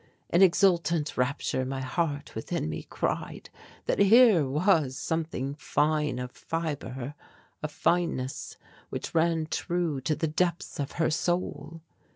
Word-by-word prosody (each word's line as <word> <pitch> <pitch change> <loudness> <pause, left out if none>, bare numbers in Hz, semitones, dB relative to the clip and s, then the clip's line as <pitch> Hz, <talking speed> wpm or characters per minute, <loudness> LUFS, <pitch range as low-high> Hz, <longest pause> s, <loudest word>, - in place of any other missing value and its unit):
In 170 - +4
exultant 170 -5 +3
rapture 130 0 0
my 130 +1 -3
heart 145 +2 -2
within 110 - -3
me 80 - -5
cried - - -3 0.3
that - - 0
here 200 - +6
was 150 -3 +2
something 155 -4 -2
fine 150 -1 0
of 125 0 -5
fibre, 145 -5 -4 0.5
a 155 - -1
fineness 155 -4 -1 0.3
which - - -5
ran 165 -1 +2
true 165 -3 -1
to 155 +3 0
the 160 - -1
depths 170 +2 -1
of 140 -1 -3
her 160 -1 +1
soul. 165 -2 -2
155 Hz, 130 wpm, -28 LUFS, 140-170 Hz, 0.5 s, here